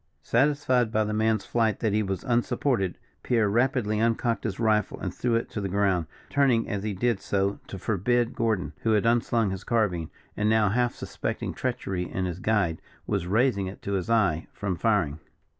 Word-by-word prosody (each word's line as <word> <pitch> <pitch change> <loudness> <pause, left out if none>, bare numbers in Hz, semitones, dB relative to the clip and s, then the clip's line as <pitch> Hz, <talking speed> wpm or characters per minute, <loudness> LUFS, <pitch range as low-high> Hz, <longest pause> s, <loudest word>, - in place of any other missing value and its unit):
Satisfied 130 -2 +2
by 110 -1 +2
the 105 0 -2
man's 110 -1 +1
flight 110 -3 +1
that 110 -3 0
he 105 - +2
was 95 -3 -3
unsupported, 120 -5 0 0.2
Pierre 115 -4 +2
rapidly 115 -1 +1
uncocked 115 +1 0
his 105 -3 -3
rifle, 110 -3 +1
and - - -4
threw 120 -2 0
it 115 - 0
to 105 - -3
the 100 - -2
ground, 95 -4 +1 0.2
turning 135 -5 +2
as 105 -3 -2
he 105 -1 -3
did 115 +1 +1
so 100 0 -1
to 95 - -7
forbid 115 +5 0
Gordon 110 -9 -1
who 110 - +1
had 105 0 +2
unslung 115 -2 +2
his 95 - -5
carbine, 95 -9 0 0.3
and 105 +1 +1
now 110 -2 +4
half 120 +3 +1
suspecting - - -4
treachery 90 -2 -3
in 95 - -1
his 90 -1 -4
guide, 100 -6 +1 0.2
was 100 -4 -1
raising 105 -1 +2
it 95 - -9
to 100 - -3
his 95 +2 -2
eye 100 -9 +2
from 100 -3 -2
firing. 85 -6 +1
110 Hz, 190 wpm, -26 LUFS, 95-115 Hz, 0.3 s, now